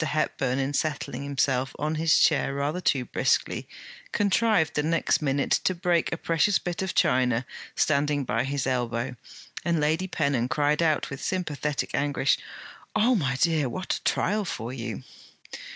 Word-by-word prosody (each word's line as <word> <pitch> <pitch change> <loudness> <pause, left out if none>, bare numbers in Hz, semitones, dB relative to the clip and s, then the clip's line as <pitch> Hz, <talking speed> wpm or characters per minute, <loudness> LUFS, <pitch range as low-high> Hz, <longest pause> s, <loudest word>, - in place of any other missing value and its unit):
Hepburn, 155 -4 -1
in 135 +1 -1
settling 150 -1 -2
himself 135 -2 0
on 150 +1 -1
his 160 +1 +3
chair 140 -3 +3
rather 145 +6 -1
too 135 -6 +1
briskly, - - 0 0.4
contrived 205 -3 +2
the 150 - +1
next 165 +2 +1
minute 140 -1 0
to 185 - +2
break 175 -1 +1
a 165 - -2
precious 170 +4 +2
bit 175 0 -4
of 190 -1 -3
China 125 -1 +2 0.3
standing 145 -1 +1
by 115 -2 0
his 140 +1 -2
elbow; 125 -1 -1 0.5
and 170 -1 +1
Lady 160 +5 +1
Pennon 140 -8 0
cried 150 +3 +1
out, 155 -4 +1
with 140 - -6
sympathetic 150 -6 -2
anguish: 140 -1 +1 0.6
'Oh, 230 +4 +4
my 140 - 0
dear, 155 -1 +2
what 185 +8 -3
a - - -5
trial 210 +2 +1
for 125 - -5
you!' 120 -1 -5
145 Hz, 155 wpm, -26 LUFS, 135-165 Hz, 0.6 s, Oh